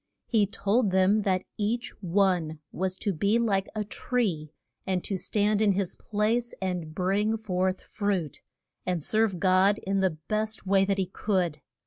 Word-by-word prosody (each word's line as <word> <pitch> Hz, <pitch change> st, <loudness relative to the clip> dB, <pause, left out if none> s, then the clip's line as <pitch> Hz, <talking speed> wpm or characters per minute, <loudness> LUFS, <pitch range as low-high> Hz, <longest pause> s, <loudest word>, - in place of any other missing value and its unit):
He 215 Hz, -4 st, +2 dB
told 210 Hz, +2 st, +1 dB
them 190 Hz, +3 st, +3 dB
that 185 Hz, -2 st, +1 dB, 0.2 s
each 230 Hz, +4 st, -1 dB
one 180 Hz, -4 st, +1 dB
was 185 Hz, 0 st, -1 dB
to 195 Hz, +1 st, -2 dB
be 200 Hz, +7 st, +2 dB
like 200 Hz, -5 st, +1 dB
a 215 Hz, -, -1 dB
tree, 200 Hz, -, -2 dB, 0.4 s
and 185 Hz, -2 st, 0 dB
to 195 Hz, -, -3 dB
stand 210 Hz, +2 st, +1 dB
in 205 Hz, -2 st, +4 dB
his 190 Hz, -1 st, -1 dB
place 225 Hz, +3 st, -1 dB
and 180 Hz, -4 st, -3 dB
bring 205 Hz, +4 st, +1 dB
forth 185 Hz, -3 st, -1 dB
fruit, 195 Hz, -, -2 dB, 0.4 s
and 175 Hz, -4 st, -2 dB
serve 215 Hz, -2 st, +1 dB
God 190 Hz, +3 st, +4 dB
in 195 Hz, +1 st, +1 dB
the 185 Hz, -5 st, +1 dB
best 215 Hz, 0 st, -2 dB
way 195 Hz, 0 st, +4 dB
that 195 Hz, 0 st, 0 dB
he 190 Hz, -, +1 dB
could. 180 Hz, -5 st, -1 dB
195 Hz, 160 wpm, -27 LUFS, 185-215 Hz, 0.4 s, in